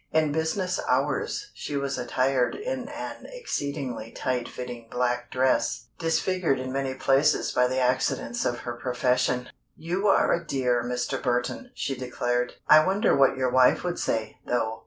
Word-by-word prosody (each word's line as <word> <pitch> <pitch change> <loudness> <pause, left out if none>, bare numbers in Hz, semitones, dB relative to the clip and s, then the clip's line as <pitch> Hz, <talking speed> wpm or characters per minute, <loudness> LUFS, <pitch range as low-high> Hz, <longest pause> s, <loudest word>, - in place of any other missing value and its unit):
In 155 -1 +2
business 160 +4 -1
hours 415 - 0
she 145 - -4
was 140 0 -1
attired 130 +1 +1
in - - -4
an - - -7
exceedingly 140 - -4
tight 125 -2 -2
fitting 120 -2 -7
black 125 0 -1
dress, 125 -2 +1
disfigured 165 -2 +1
in 130 0 -4
many 135 0 -2
places 135 +3 +2
by 125 0 +3
the 130 +1 -2
accidents 125 -2 0
of 120 0 -1
her 120 - -4
profession. 125 +1 0 0.3
"You 180 +6 -1
are 195 - +4
a 170 - -1
dear, 125 -5 0
Mr. 125 0 -2
Burton," 125 - -1
she 135 - -2
declared. 125 -1 -1
"I 155 0 +8
wonder 195 +6 +2
what 135 -1 +4
your 130 -1 +1
wife 130 0 +4
would 175 -1 -2
say, 110 -1 -2
though?" 115 -2 -1
130 Hz, 155 wpm, -26 LUFS, 125-155 Hz, 0.3 s, I